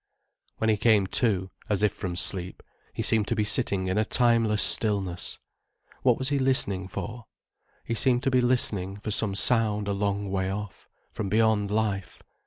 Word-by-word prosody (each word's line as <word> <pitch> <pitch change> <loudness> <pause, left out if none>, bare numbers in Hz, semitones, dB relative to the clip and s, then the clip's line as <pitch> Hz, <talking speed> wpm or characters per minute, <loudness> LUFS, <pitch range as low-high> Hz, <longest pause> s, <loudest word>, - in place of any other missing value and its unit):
When 110 0 +1
he 105 - +1
came 105 -2 +3
to, 95 -2 0 0.2
as 105 -1 0
if 105 - +2
from 90 -3 -5
sleep, 90 0 -2 0.3
he - - -4
seemed 110 -2 +2
to 115 - 0
be 110 - +1
sitting 100 -2 0
in 95 +3 0
a - - +3
timeless 115 -3 +2
stillness. 100 -5 0 0.6
What - - +3
was 130 +1 -2
he 140 -1 0
listening 100 -8 +1
for? 115 +4 -7 0.6
He 115 - -4
seemed 125 +2 +2
to 135 - +1
be 130 -1 +3
listening 105 -6 0
for 105 +1 -5
some 100 -1 0
sound 105 -2 +2
a 100 - 0
long 100 0 -2
way 95 -1 -1
off, 105 +1 -7 0.2
from 105 -3 -4
beyond 110 -1 +2
life. 105 -2 -2
105 Hz, 180 wpm, -26 LUFS, 100-115 Hz, 0.6 s, came